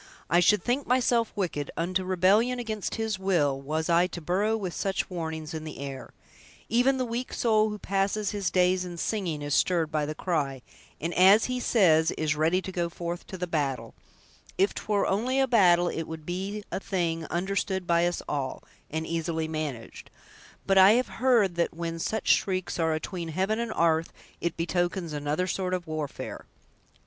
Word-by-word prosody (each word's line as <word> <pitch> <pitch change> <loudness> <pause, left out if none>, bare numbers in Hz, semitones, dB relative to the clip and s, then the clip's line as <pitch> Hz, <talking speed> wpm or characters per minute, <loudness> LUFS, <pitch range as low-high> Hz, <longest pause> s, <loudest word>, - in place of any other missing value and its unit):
I 175 - +5
should 205 +4 +4
think 255 +3 -1
myself 240 -2 +2
wicked, 165 -7 -2
unto 185 +3 0
rebellion 195 +7 +3
against 220 -4 -3
His 220 -3 -2
will, 150 -8 +1
was 155 +3 -2
I 170 +1 +4
to 175 - -7
burrow 195 +7 0
with 185 -5 -4
such 195 -1 -2
warnings 160 -3 -4
in 160 -1 -5
the 155 -1 -7
air! 135 -1 -7 0.6
Even 250 +3 +3
the 255 - 0
weak 240 +2 -4
soul 220 -2 +2
who 210 - -5
passes 200 +1 -1
his 200 -3 -1
days 180 0 +2
in 175 -1 -7
singing 170 -6 -2
is 145 -1 -2
stirred 165 -4 +2
by 150 -2 0
the 155 - -4
cry, 140 -7 -2 0.4
and, 165 +3 -3
as 195 +4 +6
he 250 0 -2
says, 165 -10 +4
is 155 -1 0
'ready 165 +5 +1
to 190 - -5
go 175 -2 -1
forth 170 0 -5
to 190 - -7
the 180 - -2
battle' 145 -6 -2 0.6
If 195 +2 +3
'twere 205 -2 0
only 245 +7 0
a 270 - +4
battle, 180 -7 +5
it 165 - -4
would 160 -1 -8
be 195 +4 -4
a - - -2
thing 170 -5 -2
understood 190 +1 -2
by 170 0 +3
us 175 - -3
all, 135 -3 -3 0.3
and 160 +1 -3
easily 165 -1 -2
managed; 155 -7 -5 0.6
but 195 0 +4
I 190 +3 +8
have 250 +2 +1
heard 235 -8 +4
that 170 -1 0
when 165 0 -4
such 220 +6 -2
shrieks 185 -2 +1
are 160 -1 +2
atween 170 +2 -5
heaven 190 +7 -1
and 235 -1 -2
'arth, 165 -3 +1 0.3
it 170 -1 -2
betokens 175 0 -1
another 150 +4 -1
sort 185 0 -1
of 180 -1 -5
warfare!" 155 -3 -5
180 Hz, 185 wpm, -27 LUFS, 160-200 Hz, 0.6 s, I